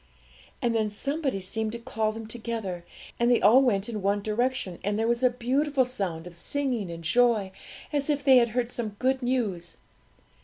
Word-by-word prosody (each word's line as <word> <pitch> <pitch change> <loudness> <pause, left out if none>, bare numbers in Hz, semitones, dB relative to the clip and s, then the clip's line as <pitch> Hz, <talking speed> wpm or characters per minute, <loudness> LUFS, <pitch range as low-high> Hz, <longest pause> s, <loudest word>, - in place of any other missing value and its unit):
And 235 -1 +2
then 220 -2 +1
somebody 275 +1 -2
seemed 220 +3 -3
to - - -3
call 220 -2 -1
them 225 0 -7
together, 220 -6 -4 0.4
and 235 0 +3
they 240 - +5
all 230 +7 +6
went 210 -7 +1
in 220 -3 -4
one 200 +1 0
direction, 220 -4 -1
and 205 +1 0
there 225 +1 +1
was 235 +1 +1
a 255 - +5
beautiful 260 +3 +1
sound 190 -10 -3
of 175 -1 -10
singing 245 +1 -2
and 170 0 -7
joy, 220 +1 +3 0.4
as 285 0 -1
if 285 -1 0
they 265 -1 +7
had 240 -1 +4
heard 245 -1 0
some 215 -4 -4
good 260 +2 +1
news. 220 -9 -2
230 Hz, 190 wpm, -27 LUFS, 205-255 Hz, 0.4 s, they